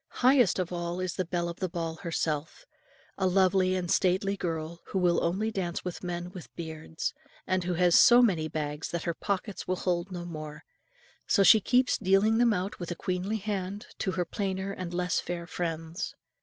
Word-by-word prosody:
Highest 255 -5 +5
of 180 -1 -2
all 175 0 -3
is 185 -1 -2
the 185 - -2
belle 175 0 -1
of 170 0 -6
the 185 - -1
ball 165 -2 -3
herself, 160 - -3 0.5
a 190 - +3
lovely 185 0 +3
and 180 -2 -2
stately 190 +2 +2
girl, 165 -2 -4
who - - -3
will 175 -2 +3
only 200 +6 0
dance 185 -4 -3
with 180 0 -5
men 175 0 -4
with 180 -3 -10
beards, 160 -1 -4 0.3
and 185 -1 0
who 180 -1 0
has 175 0 +3
so 245 +1 +8
many 170 -9 +2
bags 150 -1 -4
that 170 -1 -3
her 170 - -1
pockets 200 +2 -3
will 185 - +1
hold 180 0 -1
no 175 -1 -5
more; 155 -3 -7 0.6
so 200 - +4
she 215 +2 +8
keeps 250 +5 +2
dealing 205 +3 +3
them 240 -1 +5
out 195 -1 -2
with 175 - -5
a 175 - -3
queenly 185 +5 -2
hand, 200 +1 -4
to 190 - -1
her 180 -1 0
plainer 190 0 -3
and 185 -3 -5
less 180 0 0
fair 175 -1 -4
friends. 165 -1 -4
180 Hz, 195 wpm, -29 LUFS, 170-195 Hz, 0.6 s, so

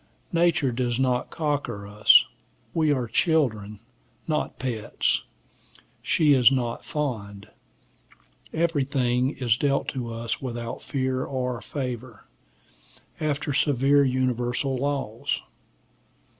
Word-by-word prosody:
Nature 170 -5 +3
does 120 0 -1
not 125 -2 +1
cocker 145 -10 -2
us: 105 +1 +6 0.5
we 155 -2 +2
are 130 -4 +1
children, 110 - 0 0.5
not 155 -2 -1
pets: 120 -5 -1 0.8
she 150 -3 +3
is 130 -1 +6
not 120 -3 -1
fond: 105 -9 -4 1.0
everything 135 -6 +1
is 125 -6 0
dealt 140 0 +1
to 120 -4 -4
us 115 0 -3
without 120 -3 -5
fear 130 -2 -1
or 125 -3 -3
favor, 125 -3 -6 0.9
after 145 -1 -1
severe 140 +1 +3
universal 130 0 0
laws. 135 -4 -2
130 Hz, 100 wpm, -25 LUFS, 120-145 Hz, 1.0 s, us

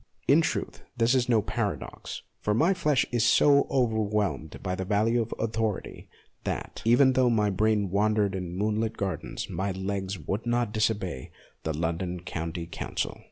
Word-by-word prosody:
In 145 +4 +6
46 - - +1
MONOLOGUES - - +1 0.3
truth, - - -25
this 115 +2 +3
is 125 -2 +2
no 115 -3 +4
paradox, - - -4 0.2
for 105 - 0
my 165 - +4
flesh 150 -7 +2
is 120 -2 +2
so 140 +4 +5
overwhelmed 105 - 0
by 90 -1 -1
the 95 - -2
value 110 +4 +2
of 115 - -4
authority, 110 -2 -2 0.3
that, - - -4
even 125 +4 +5
though 130 -1 +4
my 105 -3 +2
brain 105 -1 +1
wandered 105 0 +2
in 90 -2 -4
moonlit 110 +2 0
gardens, 95 -2 -3
my 95 +3 -2
legs 95 +1 -3
would 95 +9 -4
not 120 -2 +1
disobey 100 - -1 0.3
the 80 -1 -3
London 85 +2 -2
County 85 -1 -4
Council. 85 - -4
105 Hz, 165 wpm, -27 LUFS, 95-115 Hz, 0.3 s, In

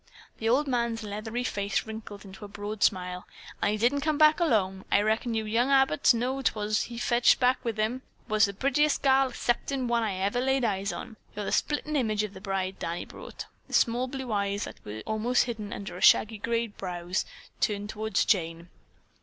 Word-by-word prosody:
The 225 - 0
old 280 +5 +3
man's 235 -3 -1
leathery 215 +4 -4
face 200 -4 -1
wrinkled 215 -2 -8
into 195 +1 -11
a - - -6
broad 205 +1 -6
smile. 180 -1 0 0.3
"An' - - +2
he 210 - 0
didn't 245 +6 +2
come 305 0 0
back 305 +2 +6
alone! 195 - +1
I - - +5
reckon 225 +2 0
you 220 -1 -1
young 230 +5 +1
Abbotts 270 - +4
know 245 +3 0
who - - -4
'twas 215 -4 0
he 235 - -8
fetched 240 0 +3
back 250 0 +2
with 230 -2 -2
him. 220 +4 -1 0.2
It 235 - -15
was 215 +1 +5
the 200 -1 -5
purtiest 280 +6 +1
gal 265 -1 +4
'ceptin' 255 +2 -1
one 235 0 +2
that 225 - 0
I - - -2
ever 200 +6 0
laid 265 -1 +1
eyes 200 -2 -1
on. 220 - -8 0.2
You're 210 0 -4
the - - -3
splittin' 300 0 0
image 215 -6 +1
of 210 -2 -5
the 190 - -11
bride 190 -1 -3
Danny 170 +1 -3
brought." - - -9 0.2
The - - -13
small 240 +2 +2
blue 260 -2 -5
eyes 200 -1 0
that - - -9
were 105 +1 -7
almost 225 +3 +2
hidden 220 -4 -5
under 180 -3 -6
shaggy 215 0 +5
gray 230 +2 0
brows 180 -3 -3 0.4
turned 205 0 -1
toward 220 -1 -5
Jane. 170 -3 +1
220 Hz, 205 wpm, -28 LUFS, 200-245 Hz, 0.4 s, back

